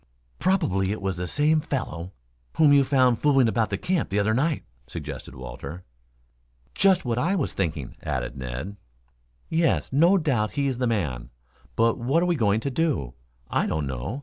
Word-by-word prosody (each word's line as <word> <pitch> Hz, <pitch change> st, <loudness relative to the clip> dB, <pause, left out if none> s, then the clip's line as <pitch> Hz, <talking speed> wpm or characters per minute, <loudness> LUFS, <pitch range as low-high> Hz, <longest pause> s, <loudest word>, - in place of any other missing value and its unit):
"Probably 100 Hz, -, +1 dB
it 110 Hz, -, -3 dB
was 95 Hz, -2 st, -2 dB
the 90 Hz, 0 st, -3 dB
same 155 Hz, -, +2 dB
fellow 95 Hz, -, -4 dB, 0.5 s
whom 150 Hz, -3 st, +6 dB
you 140 Hz, -1 st, +6 dB
found 130 Hz, -3 st, +3 dB
fooling 135 Hz, -4 st, +4 dB
about 110 Hz, -1 st, +1 dB
the 100 Hz, -, -1 dB
camp 175 Hz, -, -1 dB
the 100 Hz, -, -1 dB
other 105 Hz, +2 st, +2 dB
night," 145 Hz, +5 st, 0 dB, 0.2 s
suggested 65 Hz, -, -7 dB
Walter. 65 Hz, +7 st, -8 dB, 0.9 s
"Just 190 Hz, -4 st, +3 dB
what 120 Hz, 0 st, 0 dB
I 175 Hz, +9 st, +1 dB
was 160 Hz, -8 st, -1 dB
thinking," 75 Hz, -8 st, -3 dB
added -, -, -3 dB
Ned. 65 Hz, +11 st, -6 dB, 0.7 s
"Yes, 165 Hz, -4 st, +1 dB
no 170 Hz, +8 st, +5 dB
doubt 130 Hz, -, 0 dB
he 140 Hz, -1 st, 0 dB
is 130 Hz, -3 st, -1 dB
the 125 Hz, -, +1 dB
man. 70 Hz, -, -2 dB, 0.5 s
But 115 Hz, 0 st, +2 dB
what 140 Hz, +9 st, +2 dB
we 175 Hz, -, +2 dB
are -, -, -2 dB
going 105 Hz, -1 st, +2 dB
to 140 Hz, -, -2 dB
do, 135 Hz, -, -1 dB, 0.3 s
I -, -, 0 dB
don't 80 Hz, -2 st, -1 dB
know. 70 Hz, -, -4 dB
115 Hz, 175 wpm, -25 LUFS, 90-150 Hz, 0.9 s, whom